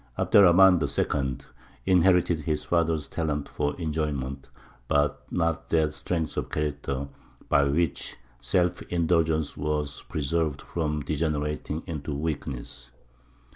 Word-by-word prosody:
Abd - - -2
er 105 - +10
Rahmān 90 -1 +6
II. 70 -2 -1 0.4
inherited 90 -2 +4
his 75 0 -2
father's 80 -4 +1
talent 75 -3 -2
for 75 +3 -2
enjoyment, 75 -4 -3 0.4
but 75 0 +1
not 80 -2 -1
that 80 -2 +2
strength 80 -2 -3
of - - -2
character 70 -2 -2 0.4
by 70 0 +4
which 75 +2 -1 0.2
self 90 +6 +1
indulgence 80 -3 +1
was 75 -1 -2
preserved 75 -1 -1
from 75 -3 -2
degenerating 75 0 -2
into 75 -4 -4
weakness. 70 -5 -5
75 Hz, 115 wpm, -27 LUFS, 70-85 Hz, 0.4 s, er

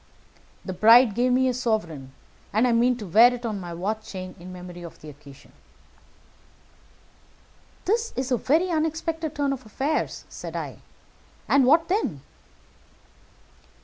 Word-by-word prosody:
The 185 - -4
bride 225 +4 +6
gave 245 +4 +1
me 260 +1 +3
a 255 - +1
sovereign, 210 - -2 0.4
and 220 +5 +2
I - - +2
mean 240 +1 +3
to 215 - -7
wear 225 +7 +6
it 245 -1 -6
on 215 -3 -3
my 175 -2 -7
watch 210 +6 -4
chain 185 -1 -7
in 180 +2 -10
memory 180 -1 -9
of 170 -2 -10
the 155 - -11
occasion." 140 -1 -15 2.3
"This 450 +4 0
is 260 0 -3
a 250 - +3
very 325 +10 +1
unexpected 320 0 -2
turn 285 -1 0
of 260 -1 -7
affairs," 275 +8 -2
said - - -8
I; - - -5 0.7
"and 275 -2 +4
what 320 +4 +4
then?" 405 +5 -1
240 Hz, 145 wpm, -25 LUFS, 185-275 Hz, 2.3 s, bride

